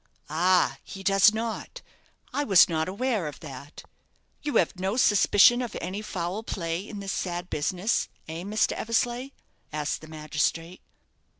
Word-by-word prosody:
"Ah, 180 Hz, +3 st, +3 dB
he 195 Hz, -, -9 dB
does 195 Hz, +1 st, +6 dB
not! 225 Hz, 0 st, -5 dB, 0.5 s
I 290 Hz, -, 0 dB
was 195 Hz, -9 st, +7 dB
not 160 Hz, 0 st, -1 dB
aware 215 Hz, -3 st, -1 dB
of 145 Hz, -, -8 dB
that. 140 Hz, -1 st, -10 dB, 0.6 s
You 295 Hz, -1 st, -3 dB
have 180 Hz, -, +2 dB
no 190 Hz, +5 st, -1 dB
suspicion 215 Hz, +1 st, +5 dB
of 240 Hz, -3 st, -4 dB
any 190 Hz, +4 st, -4 dB
foul 185 Hz, -1 st, -4 dB
play 175 Hz, -3 st, -4 dB
in 205 Hz, -2 st, -7 dB
this 195 Hz, -1 st, -4 dB
sad 175 Hz, 0 st, -4 dB
business, 180 Hz, +8 st, 0 dB, 0.2 s
eh, 160 Hz, +1 st, -5 dB
Mr. 210 Hz, +4 st, +1 dB
Eversleigh?" 240 Hz, +3 st, -1 dB, 0.4 s
asked 150 Hz, -1 st, -2 dB
the 155 Hz, -, -11 dB
magistrate. 155 Hz, +3 st, -2 dB
190 Hz, 145 wpm, -27 LUFS, 165-215 Hz, 0.6 s, was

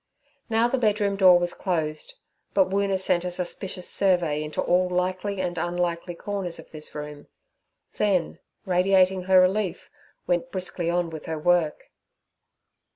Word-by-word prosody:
Now 225 Hz, +1 st, +3 dB
the 260 Hz, +2 st, -1 dB
bedroom 210 Hz, -3 st, +1 dB
door 185 Hz, -2 st, +7 dB
was 175 Hz, 0 st, -1 dB
closed, 155 Hz, -4 st, -3 dB, 0.4 s
but 190 Hz, -1 st, +3 dB
Woona 195 Hz, -1 st, +1 dB
sent 175 Hz, -2 st, +1 dB
a 180 Hz, -, -2 dB
suspicious 180 Hz, +1 st, -4 dB
survey 175 Hz, -6 st, +1 dB
into 155 Hz, 0 st, -6 dB
all 180 Hz, +1 st, +2 dB
likely 185 Hz, +2 st, -1 dB
and 175 Hz, -2 st, -2 dB
unlikely 175 Hz, 0 st, -2 dB
corners 195 Hz, -2 st, -4 dB
of -, -, -13 dB
this 155 Hz, -1 st, -10 dB
room; 150 Hz, -1 st, -7 dB, 0.7 s
then, 195 Hz, -5 st, +1 dB, 0.3 s
radiating 185 Hz, 0 st, +3 dB
her 190 Hz, 0 st, +6 dB
relief, 185 Hz, 0 st, 0 dB, 0.3 s
went 175 Hz, -1 st, 0 dB
briskly 180 Hz, -2 st, -3 dB
on 175 Hz, -1 st, 0 dB
with 160 Hz, -1 st, -8 dB
her 160 Hz, -, -3 dB
work. 170 Hz, -1 st, +1 dB
180 Hz, 145 wpm, -25 LUFS, 170-190 Hz, 0.7 s, door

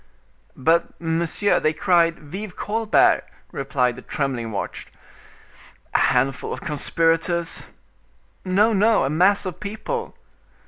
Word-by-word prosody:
"But, 165 Hz, +5 st, +1 dB
monsieur, 170 Hz, +4 st, 0 dB
they 155 Hz, -, +1 dB
cried 165 Hz, 0 st, +2 dB
'Vive 185 Hz, +6 st, -8 dB
Colbert!'" 220 Hz, +1 st, +2 dB, 0.3 s
replied 125 Hz, -3 st, 0 dB
the 125 Hz, -, -10 dB
trembling 130 Hz, -6 st, -3 dB
watch. 100 Hz, -, -5 dB, 1.1 s
"A -, -, +3 dB
handful 135 Hz, +2 st, +1 dB
of -, -, -4 dB
conspirators—" 165 Hz, +3 st, 0 dB, 0.8 s
"No, 205 Hz, +4 st, +3 dB
no; 215 Hz, +2 st, +3 dB
a 135 Hz, -, -1 dB
mass 190 Hz, +6 st, +3 dB
of 185 Hz, -3 st, -5 dB
people." 220 Hz, -, -5 dB
170 Hz, 110 wpm, -22 LUFS, 145-200 Hz, 1.1 s, A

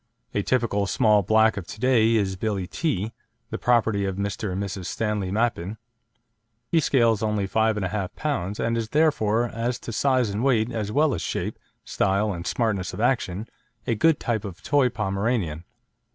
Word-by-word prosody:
A -, -, +1 dB
typical 110 Hz, -5 st, 0 dB
small 105 Hz, -2 st, +4 dB
black 110 Hz, +2 st, +3 dB
of 90 Hz, -4 st, -5 dB
to -, -, -9 dB
day 115 Hz, -2 st, +4 dB
is 100 Hz, -3 st, +1 dB
Billie 100 Hz, -1 st, -2 dB
Tee, 110 Hz, -, -2 dB, 0.4 s
the -, -, -3 dB
property 115 Hz, -4 st, +2 dB
of 95 Hz, -1 st, -2 dB
Mr. 100 Hz, 0 st, -3 dB
and 95 Hz, +2 st, -2 dB
Mrs. 95 Hz, -2 st, -5 dB
Stanley 105 Hz, -4 st, -2 dB
Mappin. 110 Hz, -1 st, -1 dB, 0.9 s
He 165 Hz, -, +4 dB
scales 115 Hz, -8 st, +3 dB
only 105 Hz, -2 st, 0 dB
5 110 Hz, +2 st, +1 dB
1/2 100 Hz, -3 st, -1 dB, 0.3 s
lb., 115 Hz, -, -2 dB
and 115 Hz, 0 st, 0 dB
is 115 Hz, -1 st, -4 dB
therefore, 120 Hz, -8 st, +2 dB
as 120 Hz, +2 st, -2 dB
to 120 Hz, -, -7 dB
size 130 Hz, -1 st, +2 dB
and 105 Hz, +4 st, -2 dB
weight 120 Hz, -4 st, +2 dB
as 105 Hz, -3 st, -3 dB
well 145 Hz, +3 st, +3 dB
as 85 Hz, -, -3 dB
shape, -, -, -3 dB, 0.3 s
style, 100 Hz, +2 st, +1 dB
and 85 Hz, 0 st, -6 dB
smartness 105 Hz, -6 st, -1 dB
of -, -, -8 dB
action, 115 Hz, -4 st, 0 dB, 0.4 s
a 120 Hz, -, +1 dB
good 145 Hz, +8 st, +3 dB
type 115 Hz, -4 st, -1 dB
of 95 Hz, -5 st, -7 dB
a -, -, -24 dB
toy 140 Hz, -3 st, +3 dB
Pomeranian. 100 Hz, -6 st, -2 dB
110 Hz, 180 wpm, -25 LUFS, 100-120 Hz, 0.9 s, small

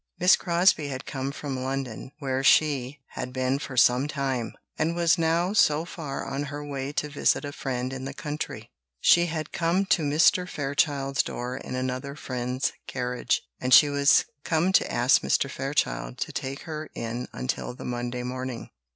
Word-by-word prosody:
Miss 180 Hz, +1 st, +7 dB
Crosbie 170 Hz, -3 st, +2 dB
had 135 Hz, -1 st, -5 dB
come 135 Hz, -1 st, -3 dB
from 140 Hz, -2 st, -5 dB
London, 130 Hz, -2 st, -4 dB
where 135 Hz, -3 st, -2 dB
she 140 Hz, -2 st, +3 dB
had 125 Hz, -, -5 dB
been 130 Hz, +1 st, 0 dB
for 135 Hz, -3 st, -7 dB
some 125 Hz, +3 st, +5 dB
time, 135 Hz, -5 st, -2 dB, 0.2 s
and 165 Hz, +2 st, 0 dB
was 170 Hz, 0 st, +3 dB
now 165 Hz, +3 st, +1 dB
so 160 Hz, -6 st, +3 dB
far 150 Hz, -6 st, -5 dB
on 135 Hz, +2 st, -3 dB
her 145 Hz, +1 st, -6 dB
way 140 Hz, -1 st, -4 dB
to 150 Hz, -, -1 dB
visit 145 Hz, 0 st, +1 dB
a 145 Hz, -, -4 dB
friend 130 Hz, -2 st, -3 dB
in 130 Hz, 0 st, -5 dB
the 135 Hz, -, -5 dB
country. 150 Hz, 0 st, -5 dB, 0.3 s
She 175 Hz, 0 st, +5 dB
had 155 Hz, -1 st, -4 dB
come 175 Hz, +4 st, +1 dB
to 190 Hz, -, +2 dB
Mr. 160 Hz, +5 st, +3 dB
Fairchild's 140 Hz, -1 st, 0 dB
door 125 Hz, +1 st, -4 dB
in 130 Hz, -, -6 dB
another 130 Hz, +2 st, -3 dB
friend's 125 Hz, -1 st, -2 dB
carriage, 125 Hz, -1 st, -1 dB, 0.2 s
and 125 Hz, -1 st, +6 dB
she 145 Hz, -, +7 dB
was 140 Hz, 0 st, +4 dB, 0.2 s
come 165 Hz, +3 st, +1 dB
to -, -, +3 dB
ask 120 Hz, +2 st, +4 dB
Mr. -, -, +1 dB
Fairchild 135 Hz, -, -2 dB
to -, -, -3 dB
take 135 Hz, +2 st, -4 dB
her 155 Hz, -2 st, -6 dB
in 120 Hz, +2 st, -4 dB
until 125 Hz, -1 st, -3 dB
the -, -, -9 dB
Monday 120 Hz, 0 st, -3 dB
morning. 130 Hz, -1 st, -5 dB
140 Hz, 175 wpm, -26 LUFS, 130-150 Hz, 0.3 s, Miss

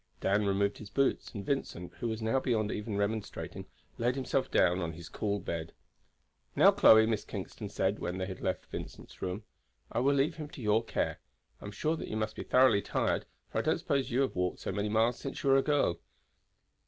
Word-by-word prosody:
Dan 100 Hz, +1 st, +2 dB
removed 100 Hz, +1 st, +1 dB
his 105 Hz, -, -9 dB
boots, 135 Hz, +4 st, 0 dB
and 100 Hz, -2 st, -5 dB
Vincent, 90 Hz, -10 st, -3 dB
who 120 Hz, -, -1 dB
was 110 Hz, 0 st, -3 dB
now 115 Hz, +4 st, +2 dB
beyond 110 Hz, -5 st, 0 dB
even 105 Hz, -1 st, -3 dB
remonstrating, 105 Hz, +1 st, -3 dB, 0.3 s
laid 120 Hz, +2 st, +1 dB
himself 130 Hz, 0 st, -1 dB
down 90 Hz, 0 st, +3 dB
on 85 Hz, -1 st, -3 dB
his 85 Hz, 0 st, -10 dB
cool 100 Hz, -1 st, -1 dB
bed. 85 Hz, -2 st, -5 dB, 0.8 s
"Now, -, -, +7 dB
Chloe," 110 Hz, 0 st, +7 dB
Miss 110 Hz, -2 st, 0 dB
Kingston 100 Hz, +1 st, -6 dB
said 100 Hz, 0 st, 0 dB
when 90 Hz, -, -3 dB
they 95 Hz, -, -2 dB
had 95 Hz, -1 st, -7 dB
left -, -, -2 dB
Vincent's -, -, -9 dB
room, 95 Hz, +4 st, -3 dB, 0.5 s
"I 115 Hz, -, 0 dB
will 140 Hz, +3 st, +3 dB
leave 150 Hz, +4 st, +1 dB
him 155 Hz, -2 st, -5 dB
to 145 Hz, -, -12 dB
your 110 Hz, +1 st, +2 dB
care. -, -, -2 dB, 0.4 s
I -, -, -9 dB
am 100 Hz, -, -5 dB
sure 155 Hz, +10 st, 0 dB
that -, -, -6 dB
you 110 Hz, -, -3 dB
must 110 Hz, 0 st, -2 dB
be -, -, -5 dB
thoroughly 125 Hz, -5 st, +5 dB
tired, -, -, -1 dB, 0.2 s
for -, -, -1 dB
I -, -, +2 dB
don't -, -, +1 dB
suppose 140 Hz, -1 st, 0 dB
you 125 Hz, +3 st, +1 dB
have 135 Hz, -, 0 dB
walked 90 Hz, 0 st, 0 dB
so -, -, -4 dB
many 105 Hz, +2 st, -1 dB
miles 115 Hz, +3 st, +2 dB
since 135 Hz, -, -6 dB
you 135 Hz, -, +3 dB
were 135 Hz, -, +7 dB
a -, -, +5 dB
girl." 145 Hz, -, +1 dB
110 Hz, 215 wpm, -31 LUFS, 100-130 Hz, 0.8 s, Now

